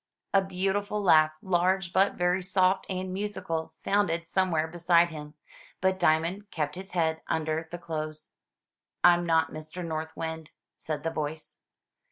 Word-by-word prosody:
A 195 - +6
beautiful 195 +2 -1
laugh, 155 -6 +5
large 185 0 +1
but 195 +1 +3
very 180 +1 +1
soft 185 +1 +2
and 185 -1 -3
musical, 185 -5 -3
sounded 175 -5 0
somewhere 170 -3 +1
beside 170 +1 +3
him, 150 -1 -9 0.4
but 190 0 +1
Diamond 170 +6 +1
kept 150 -2 -2
his 190 +2 -8
head 160 -2 0
under 160 0 -1
the 175 - -6
clothes. 155 -2 -6 0.7
"I'm 175 0 +5
not 160 -1 +3
Mr. 155 +3 -6
North 160 -1 -4
Wind," 160 -1 -5 0.3
said 150 -2 -5
the 165 - -1
voice. 155 0 -5
170 Hz, 145 wpm, -28 LUFS, 160-185 Hz, 0.7 s, A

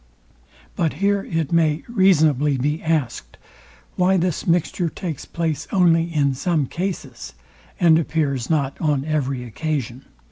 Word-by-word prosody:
But 165 -3 0
here 200 +4 +1
it 165 -3 -2
may 160 -2 +2
reasonably 155 - +3
be 150 +5 -1
asked, 150 - -2 0.6
why 185 +1 +3
this 180 -1 -1
mixture 170 0 +1
takes 160 -3 -6
place 155 -3 -3
only 170 -3 +4
in 140 -4 +1
some 155 +1 0
cases, 135 - -5 0.5
and 165 -2 +5
appears 145 -6 -1
not 140 -4 -1
on 145 -3 0
every 140 -5 -1
occasion. 130 0 -4
155 Hz, 130 wpm, -21 LUFS, 140-170 Hz, 0.6 s, and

